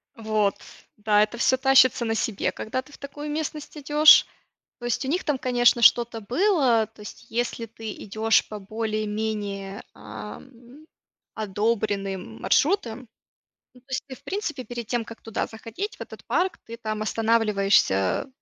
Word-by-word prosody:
Вот, 215 -3 0 0.4
да, 210 0 +3
это 225 +3 -4
всё 260 +2 +3
тащится 260 -2 +5
на 225 - 0
себе, 215 -2 -1
когда 255 +4 -4
ты 280 +2 -19
в - - -12
такую 290 +1 -7
местность 305 0 -4
идешь. 300 +1 +7 0.5
То 240 - -8
есть 240 - -1
у - - -3
них 345 +7 0
там, 295 -4 0
конечно, 245 -1 +3
что-то 235 0 +5
было, 250 - +2
то - - -23
есть 210 - -10
если 235 0 -2
ты 225 -1 -8
идёшь 220 +2 +1
по 210 - -6
более-менее, 210 -1 -3
ам, 235 - -11 0.5
одобренным 200 - -2
маршрутам. 255 - +1 0.7
Ну 250 - -19
то - - -46
есть 260 - -2
ты 260 - -8
в - - -21
принципе, 350 -10 -4
перед 240 -2 -6
тем, 240 -1 -1
как 230 - -11
туда 225 - -3
заходить, 230 - -6
в - - -13
этот - - -9
парк, 370 -1 0
ты 230 - -7
там 215 -2 -4
останавливаешься 210 - +2
230 Hz, 155 wpm, -25 LUFS, 215-260 Hz, 0.7 s, идешь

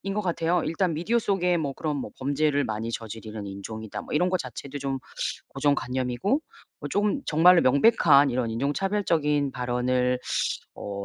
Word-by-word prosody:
것 210 - 0
같아요. 175 -1 0
일단 165 +2 0
미디어 220 +9 +1
속에 180 -5 +1
뭐 145 -4 -2
그런 150 +2 -3
뭐 135 - -4
범죄를 145 +1 +1
많이 110 -1 -3
저지르는 110 -2 -6
인종이다. 105 +2 -7
뭐 - - -8
이런 180 +4 +3
거 185 - +2
자체도 140 0 -7
좀 135 -1 -2 0.5
고정관념이고 130 0 -1 0.5
뭐 - - -6
조금 210 +7 +1
정말로 170 +3 +6
명백한 140 - +5
이런 120 -1 -1
인종차별적인 150 - 0
발언을 125 0 0 0.6
어 100 -1 -5
140 Hz, 340 characters per minute, -26 LUFS, 125-170 Hz, 0.6 s, 정말로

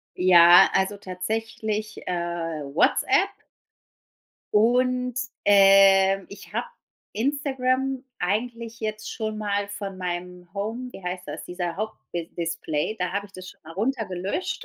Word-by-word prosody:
Ja, 175 -1 +8
also 190 +2 +1
tatsächlich, 215 +3 -4
äh, 180 - -2
WhatsApp 165 -4 +1 1.3
und, 250 +3 +2 0.3
ähm, 195 -1 +6
ich 200 - -12
hab - - 0 0.5
Instagram 265 +1 0 0.2
eigentlich 230 +4 -3
jetzt 215 -1 -4
schon 215 -2 -4
mal 205 -1 -1
von 200 -2 -6
meinem 180 0 -5
Home 225 +5 -4
wie - - -11
heißt 180 +1 -5
das, - - -6
dieser 175 -1 -4
Haupt 215 +1 -3 0.2
bis 170 -1 -4
Display, 165 +2 -2
da 180 0 -2
hab 200 0 -2
ich 200 - -15
das 185 -1 -10
schon - - -20
mal 160 - -10
runter 225 +4 -1
gelöscht. 185 - -3
200 Hz, 130 wpm, -25 LUFS, 180-220 Hz, 1.3 s, Ja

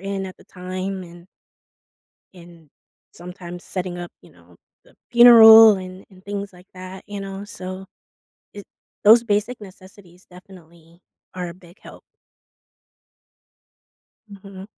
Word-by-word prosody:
in 195 0 -5
at 185 - -11
the - - -20
time 185 +1 -7
and 175 0 -15 1.1
and 170 -3 -18 0.4
sometimes 175 0 -12
setting 180 -1 -6
up, 175 - -9
you - - -20
know, - - -23 0.3
the - - -25 0.2
funeral 225 -2 +8
and 185 0 -11
and 185 -1 -21
things 200 0 -6
like 180 +2 -19
that, 185 +1 -11
you 205 -1 -8
know, 195 +1 -9
so 185 -1 -10 0.7
it 205 - -11 0.4
those 225 +3 +6
basic 215 +3 -3
necessities 185 -2 -17
definitely 170 -2 -19 0.3
are 180 -1 -6
a - - -11
big 175 0 -20
help. - - -15 2.3
Mhm. 195 -1 -13
185 Hz, 125 wpm, -20 LUFS, 180-200 Hz, 2.3 s, funeral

